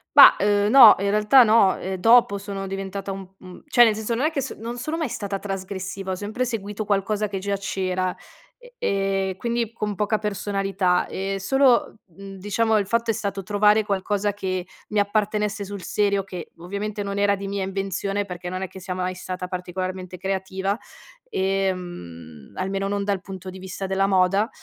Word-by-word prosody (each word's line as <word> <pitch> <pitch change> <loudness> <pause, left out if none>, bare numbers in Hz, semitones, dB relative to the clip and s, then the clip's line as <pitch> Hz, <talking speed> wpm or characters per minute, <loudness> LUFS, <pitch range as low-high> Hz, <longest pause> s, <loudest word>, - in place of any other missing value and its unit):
Mah, - - +10
uhm, 205 0 +2
no, 230 -3 +10
in 200 +1 0
realtà 215 +5 +6
no. 215 -4 +4
Eh, 190 0 -4
dopo 225 0 +5
sono 195 -1 -5
diventata 195 0 -5
un 190 -1 -7
un 185 -1 -12
cioè 245 -4 +6
nel 225 -2 +5
senso, 220 +2 -2
non 255 +6 0
è 315 - +2
che 280 - -1
s 265 - -5
non 235 +3 -6
sono 305 +7 -3
mai 320 -3 -1
stata 200 -2 -3
trasgressiva, 190 -1 -5
ho - - -1
sempre 210 +6 -3
seguito 215 -3 -4
qualcosa 205 +1 0
che 200 -1 -4
già 200 +1 -2
c'era, 185 -2 -2 0.4
e - - -17
e 195 -1 0
quindi 235 +1 -2
con 210 -2 -3
poca 210 +2 +1
personalità. 195 -3 0
Eh, 195 +1 -3
solo, 255 +1 +2
mhmm, 195 +2 -11
diciamo, 215 +3 +1
il 200 - -2
fatto 230 +2 +1
è - - -1
stato 200 -1 -3
trovare 210 +2 +3
qualcosa 205 +1 -1
che 185 -2 -3 0.2
mi 210 - +1
appartenesse 210 0 0
sul 200 -1 -7
serio, 200 -1 +1
che 180 -3 -8
ovviamente 200 +4 -4
non 200 0 -3
era 200 0 +3
di 195 0 -6
mia 200 0 -2
invenzione, 195 +1 -2
perché 180 -2 -6
non 185 +1 -4
è - - -3
che 190 - -11
sia 180 0 -4
mai 185 0 -2
stata 180 0 -5
particolarmente 185 0 -5
creativa, 190 +1 -2 0.5
ehm, 175 - -3
almeno 195 +1 -2
non 200 0 -1
dal 200 -2 -1
punto 190 -1 -8
di 190 - -10
vista 190 +1 -6
della 190 +1 +1
moda. 195 +3 +3
195 Hz, 190 wpm, -23 LUFS, 190-210 Hz, 0.5 s, Mah